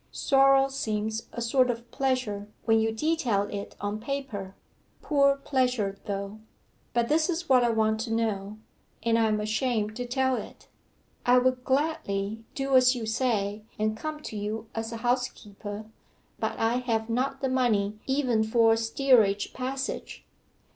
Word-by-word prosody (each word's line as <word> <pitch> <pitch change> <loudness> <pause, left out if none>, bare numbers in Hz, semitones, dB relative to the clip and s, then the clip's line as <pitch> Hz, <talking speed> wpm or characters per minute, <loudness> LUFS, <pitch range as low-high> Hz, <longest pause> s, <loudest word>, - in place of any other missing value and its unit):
Sorrow 270 -1 +4
seems 220 -4 -2
a 235 - -4
sort 255 +2 +3
of 235 0 -4
pleasure 255 -7 -1 0.2
when 225 -1 +4
you 220 0 +1
detail 240 -5 +1
it 205 0 -6
on 205 +1 -3
paper 225 -7 -5 0.5
poor 280 -2 +4
pleasure 250 -8 0
though. 200 +1 -4 0.5
'But 235 0 +1
this 315 +4 +2
is 345 0 -2
what 255 -2 +5
I 240 - +3
want 220 -1 +1
to 225 +1 -3
know 215 -2 -1 0.5
and 230 0 +2
I 225 - +3
am 215 -1 +1
ashamed 215 0 -1
to 245 0 -4
tell 260 0 +1
it. - - -9 0.6
I 245 +1 +5
would 250 0 +2
gladly 230 -8 -1
do 270 -1 0
as 255 0 +6
you 235 -2 -4
say, 220 -3 0 0.2
and 215 0 0
come 305 +6 -5
to 220 - -7
you 215 +2 -4
as 225 0 -4
a 230 - -4
housekeeper, 215 -4 -3 0.5
but - - -2
I 225 +2 +1
have 230 -3 -1
not 260 +3 -1
the 265 - 0
money 215 -5 +1
even 260 -5 +2
for 225 0 +4
a - - +1
steerage 225 -3 +3
passage. 265 +1 -4
230 Hz, 160 wpm, -27 LUFS, 215-260 Hz, 0.6 s, as